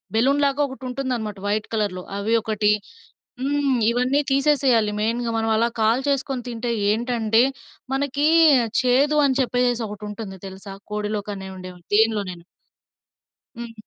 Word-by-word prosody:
Balloon 275 +5 +3
లాగా 280 +1 +1
ఒకటి 265 -2 -11
ఉంటుందనమాట 245 -6 -3
వైట్ 210 +1 -1
కలర్‍లో 200 -5 -1
అవి 205 +3 -1
ఒకటి. 215 -2 +1 0.7
హ్మ్, 280 -1 +1
ఇవన్నీ 250 +4 +1
తీసేసేయాలి 270 -6 +3
మెయిన్‍గా. 230 +2 -1
మనం 225 0 0
అలా 230 +2 +2
కాల్చేసుకొని 260 +2 0
తింటే 235 0 -3 0.2
ఏంటంటే 225 0 +1 0.5
మనకి 285 +2 0 0.5
చేదు 270 +4 +3
అని 270 -1 +1
చెప్పేసి 245 -1 0
ఒకటి 210 0 -8
ఉంటుంది 200 -2 -7
తెలుసా? 195 +1 -9 0.2
కోడిలో 210 0 -2
కనే 190 -1 -7
ఉండేవి 185 -1 -10
దేనిలోనైనా. 205 -6 +1 1.1
హ్మ్. 235 -1 -7
230 Hz, 125 wpm, -22 LUFS, 210-265 Hz, 1.1 s, Balloon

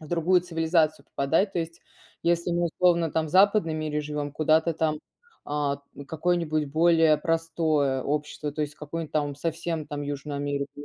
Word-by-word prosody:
в 155 - -11
другую 175 +2 +3
цивилизацию 165 -2 +1
попадать. 165 +9 0
То - - -2
есть, 165 0 -5 0.4
если 170 0 +1
мы, 175 0 +1
условно, 170 -1 +2
там 160 -1 0
в - - -8
западном 190 -3 +4
мире 155 -1 -2
живём, 150 -1 -4
куда-то 160 +2 +2
там, 155 -1 0 0.4
а 145 -1 -1 0.3
какое-нибудь 160 -1 0
более 160 0 +4
простое 160 -5 0
общество, 150 0 -3
то 155 - -5
есть, 145 -1 -4
какую-нибудь 155 +1 -6
там 145 -2 0
совсем 165 +1 -3
там 145 -1 -5
Южную 145 0 -4
Америку. 140 0 -2
155 Hz, 160 wpm, -26 LUFS, 150-165 Hz, 0.4 s, западном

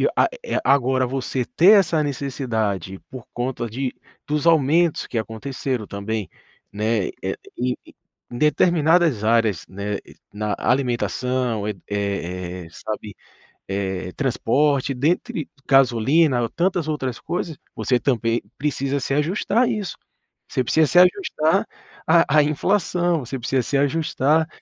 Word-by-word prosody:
a - - +4 0.2
eh, 485 - -2
agora 130 -1 +3
você 130 -1 -2
ter 195 - +6
essa 165 -5 +1
necessidade 110 - -2
por 130 -3 -9
conta 120 -1 -3
de 130 +3 -3 0.3
dos 150 +2 0
aumentos 165 +1 +3
que 120 - -4
aconteceram 115 +2 -3
também, 100 0 -4 0.4
né, 105 0 0 0.2
eh, - - -2 0.2
em 125 0 -1 0.6
determinadas 160 - +3
áreas, 110 -6 +2
né, 100 +1 -4
e - - -16 0.2
na 105 0 -2
alimentação, 125 -2 0
eh - - 0 0.2
eh 90 -3 -3
eh, - - -12
sabe, 105 +2 -6 0.5
eh, 95 -2 -3
transporte, 135 +1 +1
dentre 160 - -1 0.2
gasolina 135 +2 +4
ou 115 - -1
tantas 175 - 0
outras 130 -6 -3
coisas. 170 -3 -4 0.2
Você 125 -2 +1
também 115 -2 0 0.2
precisa 140 -1 -1
se 135 - -2
ajustar 180 - +1
a - - +2
isso, 215 -5 -3 0.5
você 130 - -1
precisa 155 +5 +3
se 175 - +5
ajustar 180 - +3 0.4
à 160 -2 +4
à 150 - +7
inflação, 175 +2 +1
você 135 +3 -4
precisa 130 +2 0
se 140 - 0
ajustar, 150 +1 +1
130 Hz, 130 wpm, -22 LUFS, 110-155 Hz, 0.6 s, à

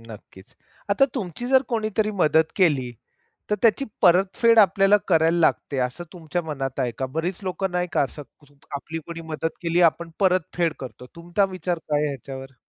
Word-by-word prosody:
नक्कीच. 105 -4 -14 0.4
आता 200 +7 +5
तुमची 235 - -4
जर 265 0 +5
कोणीतरी 215 -2 0
मदत 160 -5 +2
केली, 145 -10 +2 0.6
तर 210 - +2
त्याची 235 +5 +3 0.2
परतफेड 195 +6 +4
आपल्याला 195 +1 +5
करायला 165 -1 +3
लागते, 150 -3 +1
असं 125 +6 -2
तुमच्या 175 0 -4
मनात 135 -4 -4
आहे 125 -2 0
का? 130 - -1
बरीच 165 +7 -3
लोकं 190 0 -2
नाही 180 0 -1
का, - - +2
असं 145 +2 -3 0.5
आपली 160 +3 -5
कोणी 165 0 -7
मदत 160 +1 -3
केली, 170 +1 +1
आपण 170 0 +2
परतफेड 180 -3 +1
करतो. 125 -1 -9
तुमचा 175 +4 0
विचार 180 -1 -2
काय 150 -1 +2
आहे 150 - 0
याच्यावर? 135 0 -9
170 Hz, 165 wpm, -23 LUFS, 145-190 Hz, 0.6 s, आता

